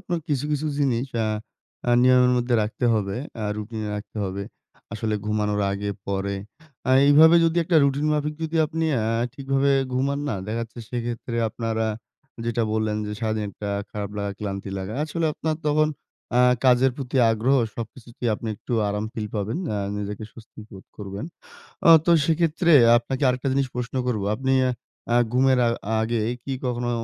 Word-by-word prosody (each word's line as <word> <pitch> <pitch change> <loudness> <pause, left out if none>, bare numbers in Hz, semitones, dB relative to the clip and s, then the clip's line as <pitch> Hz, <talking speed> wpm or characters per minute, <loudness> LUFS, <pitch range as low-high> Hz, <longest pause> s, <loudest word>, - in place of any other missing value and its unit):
আপনার 175 -3 -3
কিছু, 140 -2 0
কিছু 150 +1 -1
জিনিস 130 -3 +1 0.2
আ - - 0 0.6
আ - - +4
নিয়মের 125 0 +5
মধ্যে 120 0 +1
রাখতে 110 +4 -3
হবে। 100 -2 -1 0.3
আ - - -2
রুটিনে 105 0 -5
রাখতে 105 +2 -9
হবে। 95 +1 -4 0.5
আসলে 110 0 -2
ঘুমানোর 105 -1 0
আগে, 100 +1 -3 0.2
পরে। 100 0 -2 0.5
আ - - +3 0.2
এইভাবে 160 +4 +7
যদি 165 0 +1
একটা 165 0 +2
রুটিন 140 +2 +1
মাফিক 150 0 -1
যদি 160 +1 -2
আপনি 160 +1 -2 0.2
আ - - -1 0.3
ঠিকভাবে 135 0 0 0.2
ঘুমান 140 +2 0
না, - - -1
দেখা 110 +2 -2
যাচ্ছে 115 +1 -10
সেক্ষেত্রে 120 -1 -4
আপনার 115 +1 -3
আ - - 0 0.6
যেটা 115 0 0
বললেন 110 -1 0
যে, 105 - -4
সারাদিন 110 -2 -1
একটা 100 +2 -7 0.2
খারাপ 105 -1 -5
লাগা, 100 -1 -2
ক্লান্তি 100 -1 -4
লাগা। 95 +2 -5
আসলে 160 +1 -1
আপনার 155 +1 -2
তখন 155 +1 +3 0.5
আ - - +6 0.2
কাজের 130 +1 +5
প্রতি 135 -1 -4
আগ্রহ, 115 +5 +2 0.2
সবকিছুতেই 120 +1 -6
আপনি 110 - -6
একটু 125 - -7 0.2
আরাম 105 +1 -2
ফিল 110 -2 -4
পাবেন। 105 - -2 0.2
আ - - -1 0.2
নিজেকে 105 +1 -5
স্বস্তি 115 -1 -14
বোধ 95 -2 -12
করবেন। 100 +2 -6 0.6
আ - - +7 0.2
তো - - +4 0.2
সেক্ষেত্রে 165 +1 +2 0.3
আপনাকে 130 +3 -4
আরেকটা 125 +2 0
জিনিস 135 0 +1
প্রশ্ন 125 +1 -4
করব। 115 -5 -1
আপনি 135 +3 -1 0.6
আ - - +5 0.2
ঘুমের 130 +1 +4
আ - - +4 0.3
আগে 115 +1 0 0.2
কি 135 - -4
কখনো 120 -1 -1
120 Hz, 170 wpm, -24 LUFS, 105-140 Hz, 0.6 s, এইভাবে